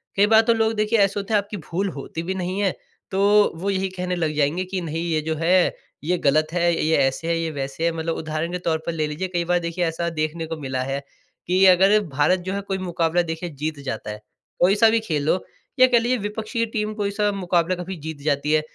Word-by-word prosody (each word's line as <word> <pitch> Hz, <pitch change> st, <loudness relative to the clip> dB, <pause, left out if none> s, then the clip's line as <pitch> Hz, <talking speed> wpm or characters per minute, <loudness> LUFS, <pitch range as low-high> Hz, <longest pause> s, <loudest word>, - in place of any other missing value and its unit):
कई 200 Hz, +1 st, +4 dB
बार 220 Hz, +1 st, +6 dB
तो 230 Hz, +1 st, +3 dB
लोग 225 Hz, 0 st, +1 dB
देखिए 215 Hz, +1 st, +1 dB
ऐसे 200 Hz, +1 st, +2 dB
होते 200 Hz, +2 st, -4 dB
हैं, -, -, +6 dB
आपकी 205 Hz, +1 st, -8 dB
भूल 195 Hz, +4 st, -1 dB
होती 165 Hz, +4 st, -5 dB
भी 190 Hz, +2 st, -3 dB
नहीं 185 Hz, +1 st, -3 dB
है, 195 Hz, -3 st, +2 dB, 0.4 s
तो 205 Hz, +2 st, +4 dB
वो 190 Hz, +5 st, -3 dB
यही 190 Hz, 0 st, 0 dB
कहने 180 Hz, 0 st, -2 dB
लग 160 Hz, -3 st, -1 dB
जाएँगे 155 Hz, +5 st, +1 dB
कि 185 Hz, 0 st, -3 dB
नहीं 165 Hz, 0 st, -3 dB
ये 155 Hz, -1 st, +1 dB
जो 160 Hz, +1 st, -2 dB
है, 175 Hz, +3 st, +3 dB, 0.3 s
ये 180 Hz, +4 st, +1 dB
गलत 155 Hz, 0 st, +2 dB
है, 175 Hz, -1 st, +2 dB
ये 160 Hz, -, +3 dB
ऐसे 135 Hz, +5 st, 0 dB
है, 170 Hz, 0 st, +1 dB
ये 165 Hz, -1 st, -2 dB
वैसे 140 Hz, +2 st, -4 dB
है। 170 Hz, -, +3 dB
मतलब 165 Hz, 0 st, -3 dB
उदाहरण 155 Hz, +2 st, -3 dB
के 180 Hz, -, -3 dB
तौर 160 Hz, -, +2 dB
पर -, -, -1 dB
ले 155 Hz, -2 st, -1 dB
लीजिए, 155 Hz, +6 st, -3 dB
कई 175 Hz, -2 st, -1 dB
बार 175 Hz, 0 st, +2 dB
देखिए 170 Hz, +1 st, -2 dB
ऐसा 170 Hz, +1 st, -2 dB
देखने 160 Hz, +1 st, -2 dB
को 165 Hz, 0 st, -4 dB
मिला 130 Hz, -3 st, -3 dB
है 135 Hz, +1 st, -2 dB, 0.5 s
कि 185 Hz, +2 st, +4 dB
अगर 190 Hz, +3 st, +6 dB
भारत 150 Hz, +6 st, +2 dB
जो 190 Hz, -, -1 dB
है 200 Hz, -, -2 dB
कोई 195 Hz, -1 st, -3 dB
मुकाबला 175 Hz, -2 st, 0 dB
देखिए 165 Hz, +1 st, -4 dB
जीत 150 Hz, +1 st, -4 dB
जाता 110 Hz, -4 st, -4 dB
है। 105 Hz, 0 st, -8 dB, 0.4 s
कोई 185 Hz, +3 st, +4 dB
सा 225 Hz, +1 st, +6 dB
भी 225 Hz, +1 st, +3 dB
खेल 155 Hz, -9 st, -2 dB
हो 185 Hz, -, +1 dB, 0.4 s
या 255 Hz, -, +8 dB
कह 240 Hz, -2 st, +4 dB
लीजिए 245 Hz, +2 st, +1 dB
विपक्षी 220 Hz, +2 st, -2 dB
टीम 215 Hz, -1 st, -3 dB
कोई 205 Hz, -2 st, -2 dB
सा 205 Hz, 0 st, +1 dB
मुकाबला 180 Hz, -2 st, 0 dB
कभी 180 Hz, +1 st, -6 dB
जीत 155 Hz, -3 st, -6 dB
जाती 150 Hz, 0 st, 0 dB
है 155 Hz, -, +4 dB
175 Hz, 245 wpm, -23 LUFS, 160-200 Hz, 0.5 s, या